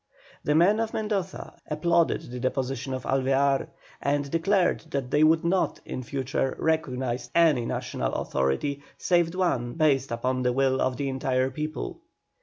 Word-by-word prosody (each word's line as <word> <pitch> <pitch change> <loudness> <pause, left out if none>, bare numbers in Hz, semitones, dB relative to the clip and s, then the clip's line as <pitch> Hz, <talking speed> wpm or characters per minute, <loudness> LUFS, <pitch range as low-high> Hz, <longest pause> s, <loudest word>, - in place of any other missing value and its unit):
The 150 - +1
men 190 +7 +5
of 225 -1 -2
Mendoza 205 -4 -3
applauded 170 +2 +2
the 125 - -5
deposition 130 +1 -2
of 130 - -6
Alvear, 135 +1 +2 0.3
and 140 0 0
declared 180 +3 +2
that 135 -4 -3
they 150 +2 +4
would 160 +1 +4
not, 185 +2 +1
in - - -5
future, 135 +1 -2
recognise 130 -6 -1
any 150 -9 +4
National - - -2
authority 70 - -1 0.2
save 175 -1 +2
one 130 -10 0
based 145 -4 +2
upon 125 +2 -1
the 125 -1 +1
will 135 0 +2
of 130 -1 0
the 140 - -2
entire 130 -1 0
people. 155 +2 -5
140 Hz, 150 wpm, -26 LUFS, 130-165 Hz, 0.3 s, men